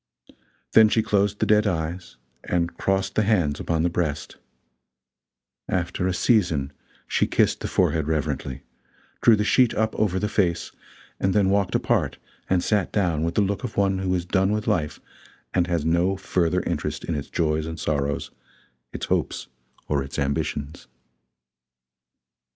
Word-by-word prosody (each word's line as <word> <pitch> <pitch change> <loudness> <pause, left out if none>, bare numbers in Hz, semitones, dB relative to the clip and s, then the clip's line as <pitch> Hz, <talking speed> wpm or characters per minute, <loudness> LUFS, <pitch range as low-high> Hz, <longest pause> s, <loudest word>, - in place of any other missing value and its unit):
Then 110 -1 +7
she 110 0 +2
closed 105 -2 +1
the - - +1
dead 105 0 +4
eyes, 85 -3 -3 0.3
and 85 -1 -1
crossed 95 0 0
the - - +2
hands 90 -9 +1
upon 80 -1 0
the - - +3
breast; 75 -5 -3 1.3
after 90 - -1
a - - +1
season, 80 - +1 0.3
she - - +1
kissed - - +2
the - - -4
forehead 80 -2 +1
reverently, 75 -4 -2 0.6
drew 115 - +6
the 105 - 0
sheet 125 +3 +3
up 110 +1 0
over 95 -4 +1
the 105 - 0
face, 90 -5 0 0.5
and 95 -1 +1
then 100 -2 +3
walked 100 -2 +1
apart - - +1 0.3
and 90 -2 +2
sat 105 -5 +1
down 85 -7 +1
with 85 +1 -2
the - - +3
look 100 0 -2
of - - -5
one 95 -1 +2
who 95 -1 0
is 90 -1 -2
done 95 +2 +1
with 105 0 -1
life 75 -3 -1 0.5
and 90 -1 +2
has 85 -4 -1
no 85 +4 +2
further 90 -4 0
interest - - -3
in 85 - -3
its 75 -2 -4
joys 80 -1 0
and 80 0 -6
sorrows, 70 -1 -1 0.6
its - - -5
hopes - - -2 0.4
or 70 -2 +1
its 70 - -8
ambitions. 70 +1 -2
90 Hz, 160 wpm, -24 LUFS, 80-100 Hz, 1.3 s, Then